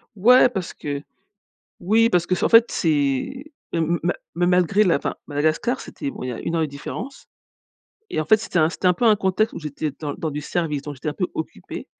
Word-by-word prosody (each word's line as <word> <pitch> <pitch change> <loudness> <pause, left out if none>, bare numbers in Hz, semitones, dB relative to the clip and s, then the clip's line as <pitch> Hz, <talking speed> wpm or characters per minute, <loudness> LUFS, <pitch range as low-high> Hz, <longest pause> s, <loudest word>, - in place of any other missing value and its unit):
Ouais, 250 +6 +6
parce 190 -7 -4
que 145 -1 -5 0.8
oui 225 +5 +3
parce 175 -3 +2
que 185 - +1
c'est - - -1
en - - +2
fait, 230 0 +6
c'est 155 - -1 0.2
m 170 0 +1
m - - -14
ma 175 - +1 0.2
mais 175 +1 +2
malgré 180 +3 +3
la 180 -5 +3
enfin, - - -3
Madagascar 155 - 0
c'était, 280 - -6
bon - - -8
il - - -4
y - - -3
a 115 - -6
1 165 - -3
heure 165 - +1
de 155 - +1
différence 150 - -8 0.8
Et - - -1
en - - -2
fait, 215 +7 +5
c'était 215 -4 -2
un 155 0 +4
c'était 185 - -3
un 180 - +4
peu 240 - -2
un 220 -2 +6
contexte 195 +3 +1
où - - -5
j'étais 150 0 -4
dans 150 -2 -3
dans 160 - -3
du 150 0 -4
service, 150 -2 -2
donc 145 0 -6
j'étais 135 +3 -5
un - - -1
peu 180 +5 -1
occupée. 155 - -6
170 Hz, 240 wpm, -22 LUFS, 150-215 Hz, 0.8 s, Ouais